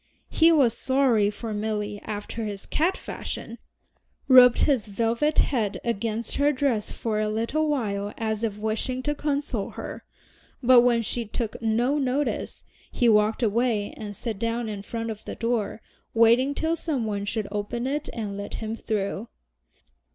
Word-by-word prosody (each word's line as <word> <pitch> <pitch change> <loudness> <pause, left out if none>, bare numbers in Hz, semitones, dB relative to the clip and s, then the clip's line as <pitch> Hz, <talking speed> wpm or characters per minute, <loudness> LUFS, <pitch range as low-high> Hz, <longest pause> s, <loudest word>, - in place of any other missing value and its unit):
He 330 0 +5
was 270 -8 +4
sorry 260 -6 +2
for 215 +1 -5
Milly 210 -1 -2
after 215 +2 -5
his 205 -2 -5
cat 350 +5 +1
fashion, 230 +1 -6 0.7
rubbed 250 -2 +8
his 260 -8 +2
velvet 230 +8 0
head 220 -7 +1
against 230 0 -2
her 285 +1 +4
dress 255 -6 0
for 220 -2 -2
a 215 0 0
little 230 +9 0
while 205 -8 -1
as 220 -1 -2
if 215 -3 -1
wishing 220 +4 -2
to 295 - 0
console 285 -7 -2
her, - - -7 0.6
but 250 0 +8
when 240 -1 +3
she 235 +2 -2
took 220 +1 -4
no 240 +6 +1
notice, 275 +2 -1 0.3
he 245 - +2
walked 215 +2 +3
away 225 -1 +1
and 205 -2 -7
sat 220 0 -4
down 230 +1 -1
in 205 -2 -5
front 225 +2 -4
of 215 0 -8
the - - -5
door, 230 -2 -2 0.3
waiting 235 +5 +4
till 320 +2 0
some 295 -8 -2
one 205 -2 -2
should 210 0 -2
open 210 +4 -3
it 290 +3 -2
and 210 -4 -4
let 200 0 -5
him 220 0 -4
through. 210 -1 -3
230 Hz, 160 wpm, -26 LUFS, 210-255 Hz, 0.7 s, rubbed